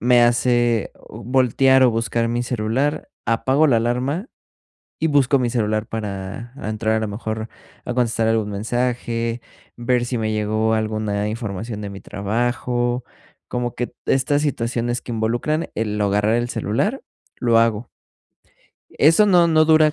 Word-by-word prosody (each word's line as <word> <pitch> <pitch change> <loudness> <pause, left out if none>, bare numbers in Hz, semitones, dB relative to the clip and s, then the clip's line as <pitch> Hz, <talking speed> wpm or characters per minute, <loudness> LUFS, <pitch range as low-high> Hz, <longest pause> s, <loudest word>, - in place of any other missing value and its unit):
me 120 0 +5
hace 120 -2 +2 0.2
voltear 130 +2 +3
o 125 - +5
buscar 115 +1 0
mi 120 +1 -1
celular, 125 +6 -1 0.2
apago 130 +7 +2
la 120 - +4
alarma 125 - -1 0.7
y 160 - +1
busco 140 -2 +3
mi 125 -2 0
celular 110 -2 0
para 105 +2 -5
entrar, 110 -2 -1
a - - 0
lo 110 - -2
mejor, 110 +1 -4 0.4
a 125 - -3
contestar 115 -2 +1
algún 110 -2 +1
mensaje, 115 +2 -2 0.3
ver 120 0 +1
si 125 - -2
me 110 -1 -1
llegó 110 +1 0
alguna 110 -1 -1
información 110 -1 -5
de 100 - -5
mi 100 - -9
trabajo. 120 +3 -1 0.4
Como 120 -1 -3
que 120 - -3
t - - -26
estas 140 +2 +2
situaciones 120 -3 -1
que 120 - -6
involucran 120 +9 -1
el 105 -1 -2
agarrar 105 +2 +2
el 120 0 -1
celular, 120 - -1 0.3
lo 115 -2 +3
hago. 115 0 +1 1.1
Eso 165 +8 +6
no, 175 -3 +5
no 155 -1 +4
dura 155 -1 +5
120 Hz, 150 wpm, -21 LUFS, 110-125 Hz, 1.1 s, Eso